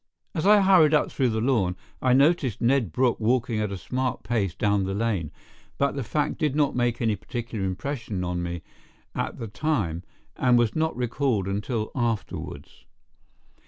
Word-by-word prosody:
As 165 +2 0
I 210 0 +7
hurried 180 -6 +6
up 150 - +1
through 130 -3 +1
the 110 -1 -1
lawn, 110 -8 +1 0.3
I 130 -1 +3
noticed 140 - +3
Ned 120 - +2
Brooke 125 +5 +1
walking 115 0 +1
at 105 -2 -1
a 100 - -3
smart 130 +8 -2
pace 105 -6 -1
down 100 -1 +1
the 95 +1 -2
lane, 100 -8 -1 0.5
but 140 0 +2
the 135 - -4
fact 150 +8 -1
did 150 -4 0
not 150 -2 +2
make 120 -1 0
any 110 -2 +2
particular 115 0 -5
impression 100 0 -3
on 90 0 -2
me 85 -1 -4 0.5
at - - -3
the 115 - -5
time, 105 - -1 0.3
and 125 -1 +3
was 120 -3 +2
not 160 0 0
recalled 125 -4 0
until 105 +3 -2
afterwards. 115 -6 -4
120 Hz, 170 wpm, -25 LUFS, 100-135 Hz, 0.5 s, I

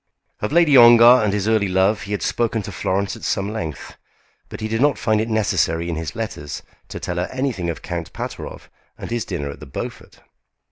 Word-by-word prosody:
Of - - -3
Lady 160 -3 +4
Ongar 120 0 +8
and 105 - +1
his 105 0 -1
early 110 -2 +2
love 95 +3 +2
he 100 - -8
had 105 - -2
spoken 115 -2 0
to - - -7
Florence 100 +3 -1
at 115 - -13
some 100 +2 -1
length, 80 -10 -6 0.5
but - - -8
he 110 - -3
did 115 +2 -1
not 145 0 +3
find 110 -2 +1
it 115 - -3
necessary 85 -6 0
in 85 - -2
his 80 -3 -5
letters 75 0 -5 0.2
to - - -7
tell 90 - -4
her 90 - -1
anything 130 -10 -2
of 85 - -5
Count - - -5
Pateroff - - -7 0.3
and - - -8
his 120 -4 -1
dinner 70 0 -4
at - - -11
the - - -10
Beaufort. 65 - -8
105 Hz, 215 wpm, -21 LUFS, 90-115 Hz, 0.5 s, Ongar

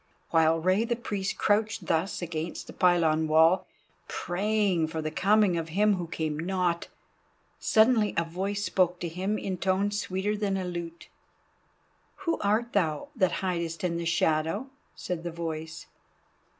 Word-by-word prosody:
While 160 0 +4
Rei 185 +6 +2
the 235 +1 -1
Priest 205 -4 -3
crouched 210 +1 +1
thus 170 +3 -1
against 165 0 -4
the - - -11
pylon 165 -3 +3
wall, 160 +4 +4 0.4
praying 195 -2 0
for 160 0 -4
the 155 0 -3
coming 195 0 +3
of 165 0 -5
him 205 +4 +3
who 175 -2 -4
came 155 -2 -3
not, 175 0 -1 0.7
suddenly 220 -1 +3
a 170 - +3
voice 195 +5 -3
spoke 180 -1 +1
to 175 - -2
him 190 +6 -2
in 185 -3 -4
tones 200 +2 +1
sweeter 190 +3 -1
than 200 -2 -1
a 185 - -3
lute. 170 -1 -6 1.2
"Who 330 - 0
art 215 +4 0
thou 165 - 0
that 185 -7 +2
hidest 170 -3 -2
in 170 -2 0
the 170 - -3
shadow?" 170 - 0 0.2
said 180 -2 -4
the 175 - -3
voice. 160 -1 -5
180 Hz, 150 wpm, -28 LUFS, 165-205 Hz, 1.2 s, While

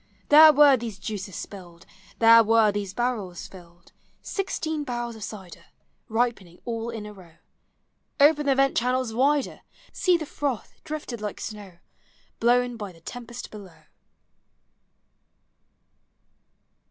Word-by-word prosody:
There 310 +1 +9
were 290 -2 +6
these 225 -4 -6
juices 200 -4 -6
spilled; 175 -4 -10 0.3
There 230 0 +7
were 225 -1 +4
these 200 -2 -4
barrels 215 -7 -3
tilled; 175 -2 -17 0.3
Sixteen 315 -6 -3
barrels 240 -3 -4
of 220 - -12
cider 190 -5 -9 0.4
Ripening 220 -6 -2
all 230 -1 -4
in 225 -3 -6
a 210 - -9
row! 175 -5 -16 0.8
Open 295 0 +4
the 275 - +3
vent 275 0 +2
channels 250 -1 0
wider! 280 +3 0 0.3
See 360 -2 +2
the 315 - -6
froth, 280 -5 -4
drifted 300 -7 -6
like 210 -2 -5
snow, 205 -5 -8 0.6
Blown 245 +1 +2
by 205 -3 -7
the 165 -2 -20
tempest 240 +6 -9
below 195 -5 -13
230 Hz, 125 wpm, -25 LUFS, 200-260 Hz, 0.8 s, There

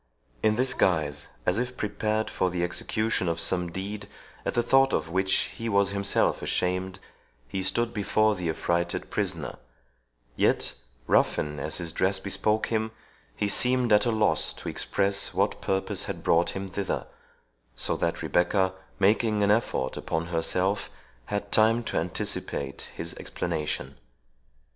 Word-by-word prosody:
In 110 0 +3
this 130 +2 +1
guise, 75 - +1 0.2
as 90 +5 +2
if 125 +1 -3
prepared 110 +1 -1
for 95 - 0
the 90 -1 -1
execution 110 +3 0
of 85 0 -1
some 90 -1 +1
deed, 100 +3 -5 0.4
at - - -1
the 120 - +3
thought 135 +2 +4
of 80 +1 0
which 95 +2 +2
he 115 0 -3
was 100 -1 +3
himself 100 0 +1
ashamed, 90 +1 -1 0.5
he 95 +10 -3
stood 115 +5 0
before 110 +1 +2
the 90 -4 -3
affrighted 85 +2 -1
prisoner; - - -2 0.8
yet, - - +2 0.3
ruffian 75 -1 +2
as - - -3
his 85 -2 -4
dress 95 +3 +1
bespoke 105 +2 0
him, 110 0 +1 0.5
he 105 - 0
seemed 125 +2 +3
at 105 +3 +5
a - - +3
loss 110 -1 +2
to - - -6
express 100 0 0
what - - +1
purpose 95 0 -1
had - - -5
brought 85 +1 +3
him 95 0 -3
thither, 95 +1 -2 0.7
so - - -1
that - - -1
Rebecca, 95 +2 +2 0.2
making 105 +1 +3
an 100 - +4
effort 105 - 0
upon 80 0 -2
herself, 90 +4 0 0.4
had 100 0 -3
time 115 +2 +4
to - - -2
anticipate 70 -1 -3
his 85 0 -4
explanation. 75 -5 -3
100 Hz, 150 wpm, -27 LUFS, 90-110 Hz, 0.8 s, at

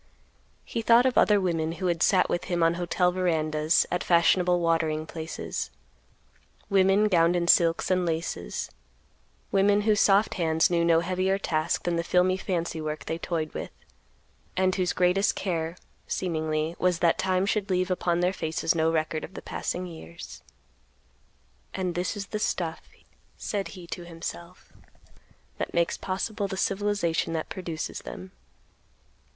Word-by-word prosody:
He 230 - -3
thought 235 +2 +5
of 260 - +2
other 210 -1 +5
women 165 -4 -1
who 170 +3 -5
had 170 -2 0
sat 185 0 +4
with 175 - -2
him 175 -2 0
on 165 0 +4
hotel 180 +1 +1
verandas, 160 -3 +1
at 180 - -1
fashionable 175 +1 +3
watering 160 -2 0
places; 160 0 -5 1.0
women 195 +2 +4
gowned 170 -3 +3
in 170 -1 0
silks 170 +1 +4
and 185 -1 +2
laces; 165 - -3 0.8
women 200 +1 +3
whose 210 -1 +2
soft 200 +2 +4
hands 160 -3 +2
knew 170 -1 +2
no 165 -1 +4
heavier 185 +2 0
task 155 -5 -1
than 175 -1 0
the 170 - 0
filmy 180 +1 +3
fancy 175 -4 -3
work 155 0 -4
they 165 - -3
toyed 160 -3 -3
with, - - -5 0.9
and 185 0 +2
whose 185 -1 0
greatest 185 +3 +2
care, 165 -2 -2 0.3
seemingly, 160 -2 -2
was 180 -1 +2
that 170 0 +2
time 185 0 +1
should 205 0 -1
leave 185 0 0
upon 175 -1 0
their 180 +1 +2
faces 160 -2 -1
no 160 -1 +2
record 155 -1 -1
of 190 - -9
the - - -5
passing 180 +1 -3
years. 85 - -10 1.3
"And 185 -2 -2
this 180 +4 -2
is 200 - -4
the 215 - -1
stuff," 165 -5 -2 0.6
said 200 -2 -3
he 180 - -9
to 175 +1 -6
himself, 170 +1 -8 0.9
"that - - -4
makes 170 0 +2
possible 200 +2 -3
the 190 -1 -5
civilization 195 -5 0
that 160 -1 -3
produces 170 -4 -5
them." 185 - -9
175 Hz, 155 wpm, -27 LUFS, 165-190 Hz, 1.3 s, thought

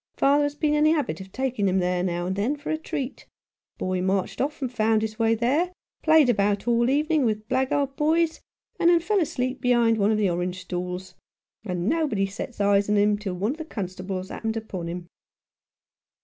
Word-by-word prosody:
Father 285 +1 +4
has 290 0 -3
been 300 0 +1
in 300 0 +3
the 310 - +5
habit 245 - -2
of 190 0 -11
taking 255 -5 -1
him 190 0 +2
there, 180 -1 +1
now 175 -1 -1
and 185 +1 -2
then, 220 +9 0
for 290 +1 -5
a 315 - 0
treat; 280 -4 -5 0.5
boy 185 -1 -1
marched 190 0 -1
off 290 +3 -2
and 260 -4 -3
found 220 -1 +2
his 220 0 -4
way 225 0 +3
there, 280 +11 +1 0.3
played 315 -3 +5
about 205 -2 +1
all 235 +1 +3
evening 300 +2 +2
with 215 -2 -1
blackguard 265 +2 0
boys, 320 +2 +1 0.4
and 340 - +5
then 345 -1 +5
fell 400 +5 +1
asleep 255 -5 -2
behind 235 -2 +3
one 200 +1 +3
of 220 - +2
the 210 -2 +2
orange 180 +1 -2
stalls; 180 0 -5 0.5
and 180 -2 -2
nobody 280 -10 +1
set 200 +8 -5
eyes 245 - -21
37 200 - +1
Rough 200 - +4
Justice, 200 +1 0
on 210 - +3
him 205 0 +3
till 200 -3 -4
one 200 +6 0
of 300 - -6
the 320 - -6
constables 185 - -5
happened 225 0 -3
upon 190 -6 -5
him." 175 0 -6
220 Hz, 215 wpm, -25 LUFS, 190-285 Hz, 0.5 s, the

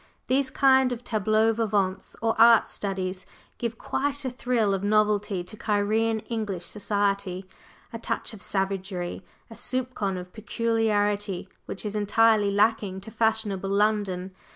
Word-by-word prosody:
These 265 0 +1
kind 265 -1 +4
of 245 0 -5
"tableaux 220 0 +2
vivants" 205 -4 -1
or 225 -1 +2
"art 230 -1 +7
studies" 190 -2 -4 0.4
give 230 -2 -3
quite 285 +2 -2
a 260 - -1
thrill 240 -4 0
of 195 0 -2
novelty 210 -2 +1
to 185 +5 -11
Cairene 215 +1 0
English 210 -6 -3
Society, 200 -3 -1 0.5
a 230 - -5
touch 230 - -2
of 210 - -10
savagery, 190 -2 -2 0.3
a - - -7
soupçon 245 -6 -2
of 180 0 -9
peculiarity 210 -4 0 0.2
which 195 - -5
is 210 0 -3
entirely 210 0 +3
lacking 205 -1 +1
to 220 - -10
fashionable 215 -4 0
London. 200 -2 0
210 Hz, 135 wpm, -26 LUFS, 195-225 Hz, 0.5 s, art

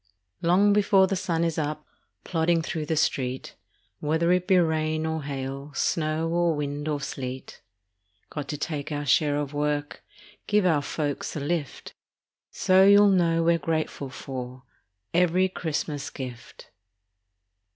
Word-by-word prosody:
Long 190 +4 +4
before 200 -2 +4
the 195 - -1
sun 170 -3 -1
is 165 -1 0
up, 150 0 -3 0.4
Plodding 165 -1 +1
through 155 -1 -4
the 160 - 0
street, 130 -4 -1 0.5
Whether 160 +3 +1
it 180 0 +1
be 190 -2 +5
rain 155 -2 +1
or 160 0 -2
hail, 135 0 -5
Snow 155 0 0
or 170 -1 +1
wind 145 0 -3
or 150 -2 -1
sleet. 130 -2 -6 0.7
Got 145 -2 -5
to 150 - -4
take 150 -1 -4
our 145 0 -3
share 145 0 +3
of 145 -1 -3
work, 145 0 -2 0.4
Give 210 -2 +3
our 160 -5 +3
folks 145 0 -3
a - - -2
lift. 145 -1 -3 0.6
So 185 0 +4
you'll 200 +1 +7
know 170 -3 +3
we're 170 0 +3
grateful 155 -3 -2
for 130 -1 -7 0.5
Every 180 +2 +3
Christmas 150 -5 -3
gift. 125 -3 -9
155 Hz, 140 wpm, -26 LUFS, 145-170 Hz, 0.7 s, you'll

